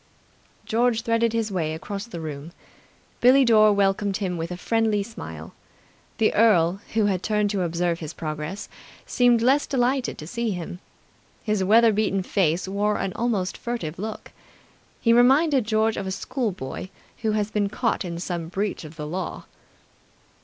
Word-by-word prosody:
George 230 0 +1
threaded 230 0 +2
his 225 -2 -1
way 160 -4 -1
across 200 +6 -6
the 200 -8 -7
room. 155 +1 -7 0.7
Billie 260 +2 +6
Dore 215 -2 +6
welcomed 200 0 +1
him 190 -4 -2
with 165 0 -4
a 180 - -5
friendly 220 +1 +1
smile. 225 +3 -9 0.6
The 220 - +2
earl, 195 -4 +3
who 220 -2 +3
had 190 -3 0
turned 210 -1 0
to 200 -3 -1
observe 170 0 -1
his 155 -3 -6
progress, 155 +5 -5 0.4
seemed 245 -2 +3
less 270 +4 +3
delighted 260 -1 0
to 155 - -8
see 235 +7 -2
him. 175 0 -6 0.6
His 210 -3 0
weather 225 +3 +5
beaten 200 -2 0
face 180 -2 0
wore 205 +2 0
an 190 - -2
almost 215 -6 -1
furtive 205 -10 -5
look. 215 +2 -6 0.7
He 230 - +3
reminded 265 +2 +4
George 220 0 +1
of 190 - -3
a - - -2
schoolboy 190 - -4 0.3
who 220 -2 0
has 210 0 -1
been 205 -1 0
caught 230 +2 -1
in 170 -2 -5
some 170 -2 -4
breach 195 +3 -3
of 155 +1 -10
the 150 -2 -6
law. 180 +5 -5
205 Hz, 160 wpm, -24 LUFS, 180-230 Hz, 0.7 s, Billie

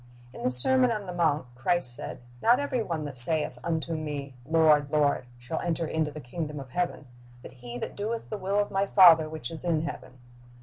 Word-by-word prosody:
In - - -10
the - - 0
sermon 250 - +5
on 210 -3 -4
the 180 - -6
mount 160 -5 0
Christ 125 +2 +1
said, 120 - -7
" 120 - -23
Not 240 +3 +4
every 275 -4 -2
one 165 -7 -4
that 140 -4 -1
saith 150 -1 +4
unto 165 0 -2
Me, 145 -3 -5
Lord, 155 -3 +3
Lord, 145 -4 +1
shall 125 +7 -5
enter 170 -1 -2
into 160 -1 -2
the 155 - -9
kingdom 150 +2 -6
of 135 -2 -11
heaven; 175 -2 -3 0.4
but - - -10
he 120 0 -7
that - - -6
doeth 225 +3 -5
the 215 - -3
will 195 +2 -2
of 205 0 0
My 195 +1 0
Father 165 -6 +6
which 155 -6 -7
is 165 - -4
in 165 -3 0
heaven." 130 -5 -8
160 Hz, 215 wpm, -27 LUFS, 140-180 Hz, 0.4 s, Father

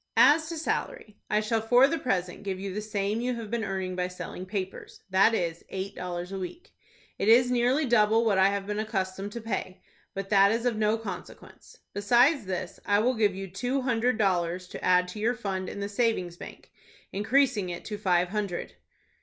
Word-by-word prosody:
"As 315 +2 +6
to 335 - -4
salary 310 - -3
I 210 - +2
shall 220 +1 0
for 245 +4 +5
the 330 +3 -1
present 180 -7 -2
give 195 -2 -4
you 195 -1 -5
the 210 - -3
same 210 +1 -2
you 250 0 -1
have 225 -2 -7
been 235 -1 -1
earning 190 -2 -3
by 180 0 -1
selling 180 0 -7
papers,—that 195 +1 0
is, 170 -4 -2
eight 195 +1 -4
dollars 180 0 -5
a 195 - -4
week. 330 - -8 0.5
It - - 0
is 245 +2 +6
nearly 250 +5 +2
double 225 -1 +3
what 200 -4 +3
I 190 +1 +6
have 200 -1 -2
been 210 +1 -3
accustomed 195 -2 -3
to 235 - -5
pay, 190 -4 -4 0.4
but 195 0 -4
that 200 -1 +5
is 230 +2 -1
of 245 -2 +1
no 215 +1 +2
consequence. 195 -6 -9 0.2
Besides 240 +6 +3
this, 185 -1 -4
I 205 - +2
will 240 +5 +2
give 210 -5 +1
you 195 0 -5
two 245 +9 -2
hundred 245 -1 +1
dollars 180 -3 0
to - - -8
add 180 0 +4
to 210 - -7
your 235 +3 +1
fund 190 -5 -3
in 200 - -6
the 200 - -2
savings 205 -5 0
bank, - - -11 0.4
increasing 220 -1 +2
it 175 0 -6
to 210 -1 -5
five 180 -1 +2
hundred." 200 -3 -4
205 Hz, 200 wpm, -28 LUFS, 185-235 Hz, 0.5 s, As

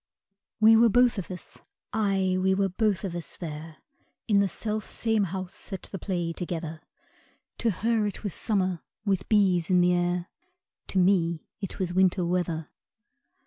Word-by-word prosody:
We 220 +1 +7
were 230 +1 +6
both 245 -1 +4
of 185 - -6
us 180 -2 -8 0.3
aye, 195 -3 +1
we 190 0 +3
were 195 0 +1
both 205 +1 0
of 190 -3 -3
us 175 - -6
there, 155 -1 -7 0.5
In 205 -3 +4
the 200 - +3
self 215 +3 -4
same 220 -3 +1
house 185 +2 -6
at 190 - -5
the 195 - -7
play 175 -3 -2
together, 165 -2 -5 0.8
To 235 - +2
her 220 +2 +1
it 205 - -3
was 200 -5 -3
summer, 185 -5 -1 0.2
with 195 -3 0
bees 190 -5 +3
in 180 -1 +5
the 180 0 +4
air 175 0 0 0.6
To - - -3
me 175 -3 +2
it 195 -3 -5
was 185 -3 -2
winter 185 -1 +3
weather. 170 -3 -1
185 Hz, 165 wpm, -27 LUFS, 175-205 Hz, 0.8 s, We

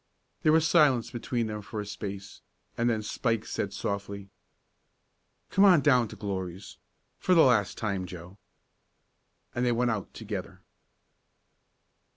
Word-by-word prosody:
There 155 - +4
was 160 0 +4
silence 145 -8 +4
between 120 0 -2
them 105 -1 -4
for 105 +1 -6
a 105 - -4
space, 100 -1 -7 0.3
and 120 +1 +1
then 110 -2 0
Spike 115 0 -1
said 100 - -3
softly: 100 0 -4 1.2
"Come 195 - +4
on 180 -6 +7
down 125 -4 +4
to 110 - -10
Glory's 95 -2 -5 0.4
for 185 - +3
the 165 - +7
last 110 -6 +3
time. 100 -4 -2
Joe." 90 +3 -10 1.1
And 120 - -1
they 125 - +2
went 120 +1 +1
out 105 -3 -4
together. - - -6
110 Hz, 140 wpm, -28 LUFS, 100-125 Hz, 1.2 s, on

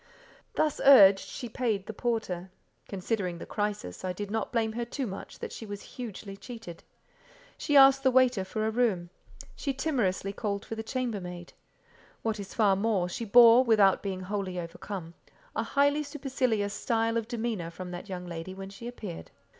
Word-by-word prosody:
Thus 305 -2 +1
urged, 200 -8 +9
she 250 - -6
paid 225 -4 -1
the 220 - -6
porter: 210 -6 -2 0.4
considering 190 -2 -2
the - - -8
crisis, 205 - -3
I 185 -1 -2
did 205 +2 -6
not 220 -1 -2
blame 225 -2 0
her 240 +1 -2
too 255 +3 -4
much 195 -3 -7
that - - -6
she - - -8
was 205 -2 -7
hugely 210 -5 -7
cheated; 225 -6 -10 0.7
she 290 - +2
asked 270 0 +8
the 265 - +4
waiter 255 -5 +4
for 215 +3 -3
a 220 - +1
room; 210 -8 0 0.4
she 275 -2 -3
timorously 205 -10 0
called 200 -2 -3
for - - -6
the 220 - -4
chambermaid; 205 -8 -4 0.7
what 220 -2 -1
is 195 -1 -8
far 205 -4 +4
more, 200 -3 +1
she 230 +6 -4
bore, 235 +3 +8
without 210 -5 +4
being 190 -2 -4
wholly 190 -1 -3
overcome, 170 0 -7 0.4
a - - +1
highly 285 +1 +2
supercilious 260 -8 -1
style 225 +1 0
of 230 -1 -1
demeanour 225 -7 -3
from 180 +1 -8
that 180 +4 -7
young 180 -1 -5
lady, 175 +2 -6
when 195 0 -8
she 215 +4 -9
appeared. 210 -8 -7
215 Hz, 175 wpm, -29 LUFS, 190-240 Hz, 0.7 s, urged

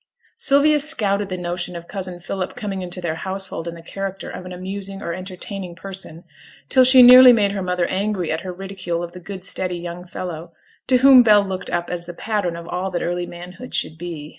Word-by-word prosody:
Sylvia 300 -7 +3
scouted 205 -10 0
the 185 - -3
notion 175 0 -3
of 170 0 -8
cousin 185 -3 -5
Philip 185 +1 -4
coming 205 -5 -4
into 180 0 -4
their 170 -2 -2
household 190 -3 -4
in 170 - -5
the 165 - -12
character 195 +2 -6
of 180 - -8
an - - -9
amusing 195 +2 -6
or 170 - -4
entertaining 185 0 -7
person, 185 -3 -7 0.5
till 260 - +6
she 255 0 +8
nearly 250 +1 +10
made 210 -4 +3
her 200 -1 -3
mother 180 -1 0
angry 190 -2 -1
at 160 - -2
her 185 - -6
ridicule 180 -2 -5
of 170 - -6
the 180 - -10
good 185 +1 -7
steady 180 -1 -2
young 175 +1 -7
fellow, 175 -2 -7 0.4
to 255 - +4
whom 265 0 +8
Bell 210 -3 +5
looked 190 -1 -5
up 175 0 -2
as 175 -1 -5
the 175 - -8
pattern 205 -5 -2
of 170 0 -9
all 180 +2 -3
that 180 -2 -3
early 175 0 -2
manhood 180 +8 -9
should 160 - -3
be. 165 -4 -7
185 Hz, 215 wpm, -21 LUFS, 175-200 Hz, 0.5 s, nearly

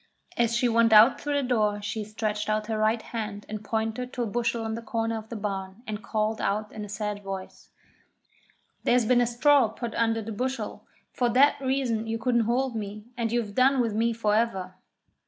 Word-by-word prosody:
As 235 -1 +1
she 250 0 +2
went 230 -1 +4
out 220 +4 +7
through 290 0 -1
the 280 -3 0
door 210 -4 +1
she 210 +1 -4
stretched 215 0 -3
out 215 0 0
her 220 0 -2
right 220 +2 +2
hand 210 -3 -5
and 215 0 -6
pointed 225 +3 -2
to 245 - -1
a - - -1
bushel 230 +1 -1
in 220 - -2
the 230 - -4
corner 225 0 -2
of 220 0 -7
the 235 - -6
barn, 195 0 -5
and 215 -2 -5
called 215 0 -1
out 210 +1 -1
in 215 - -7
a 210 - -8
sad 210 0 -3
voice: 195 -1 -7 1.1
'There's 245 -1 +3
been 245 +2 +4
a 240 - +2
straw 270 +2 +4
put 225 +1 -6
under 225 -1 +1
the 225 - -6
bushel 255 +5 -4 0.3
for 245 -1 +1
that 275 +4 +4
reason 260 -4 0
you 225 0 -1
couldn't 235 -1 +1
hold 255 0 0
me, 210 0 -5
and 230 -2 -1
you've 230 -4 -1
done 260 +3 +4
with 230 -3 +1
me 230 +2 +1
for 220 -2 0
ever!' 195 -5 0
225 Hz, 210 wpm, -27 LUFS, 215-240 Hz, 1.1 s, out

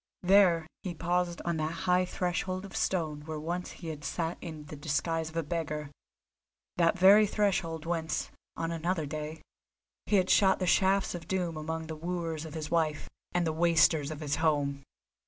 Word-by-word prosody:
There 180 -3 +5 0.2
he 180 -3 -5
paused 175 +1 -1
on 170 -1 0
that 160 +3 -3
high 180 0 +3
threshold 185 +1 -2
of 195 - -10
stone 155 -5 -1
where 155 -1 -4
once 175 +3 -3
he 165 - -8
had 150 -2 -7
sat 165 +1 -2
in 160 -4 -7
the 150 - -8
disguise 160 +3 -1
of 160 - -8
a 165 - +1
beggar, 150 -2 -3 0.9
that 170 0 +3
very 200 +3 +7
threshold 175 -6 0
whence, 165 -2 -2 0.3
on 165 0 -2
another 165 0 -1
day, 155 +1 -6 0.6
he 210 - +2
had 185 -2 +3
shot 190 -2 +5
the 185 - -1
shafts 195 +2 +3
of 170 -2 -7
doom 180 -3 -1
among 160 +1 -4
the 160 0 -6
wooers 165 -1 -3
of 160 - -8
his 155 -2 -5
wife 155 -3 0 0.2
and 175 -1 +2
the 160 - 0
wasters 160 -3 +3
of 155 -1 -6
his 145 -1 -1
home. 145 -3 +1
165 Hz, 180 wpm, -30 LUFS, 155-180 Hz, 0.9 s, very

